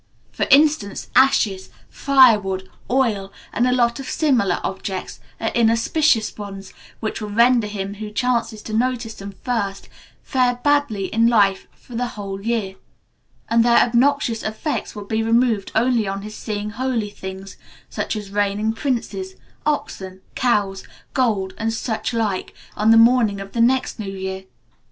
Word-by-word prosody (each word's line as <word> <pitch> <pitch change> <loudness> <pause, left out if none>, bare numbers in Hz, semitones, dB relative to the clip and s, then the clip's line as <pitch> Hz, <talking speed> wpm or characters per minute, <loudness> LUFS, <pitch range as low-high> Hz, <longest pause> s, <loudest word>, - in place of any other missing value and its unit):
For - - -2
instance, 285 -8 +3
ashes, 205 -8 +3 0.2
firewood, 210 -9 +3 0.2
oil, 220 -6 +1 0.2
and 245 - +2
a - - +2
lot 240 0 +2
of 270 - -6
similar 240 - +1
objects, 190 0 -4 0.2
are - - 0
inauspicious 230 +2 +2
ones, 195 -2 -8 0.3
which 220 0 -3
will 210 - -4
render 235 +1 +4
him 200 -1 -4
who 210 +1 -7
chances 230 -1 -1
to 220 - -7
notice 240 0 0
them 200 0 -8
first 205 -6 -2 0.3
fare 250 -2 +1
badly 285 -9 +2
in 225 +1 +4
life 200 -5 +3
for 245 - -16
the 245 +1 -1
whole 195 -1 -5
year, 210 -4 -2 0.7
and 230 +1 +3
their 235 0 +4
obnoxious 240 -1 +2
effects 215 +8 -3
will 205 -1 -7
be 220 +2 -1
removed 225 -2 +1
only 230 -1 +2
on 195 +1 -4
his 215 0 -8
seeing 210 -1 -4
holy 235 -3 -2
things, 190 -1 -8 0.3
such - - -3
as 205 -2 -6
reigning 205 +2 0
princes, 285 +10 -3 0.3
oxen, 190 -10 -3
cows, 200 -6 0 0.3
gold, 210 -8 0
and 225 0 -1
such 225 0 -2
like, 215 -5 -2 0.2
on 210 +1 +2
the 225 - +7
morning 230 -3 +4
of 195 0 -8
the 235 - 0
next 255 +1 +2
new 200 -2 -4
year. 190 0 -5
220 Hz, 150 wpm, -21 LUFS, 200-245 Hz, 0.7 s, the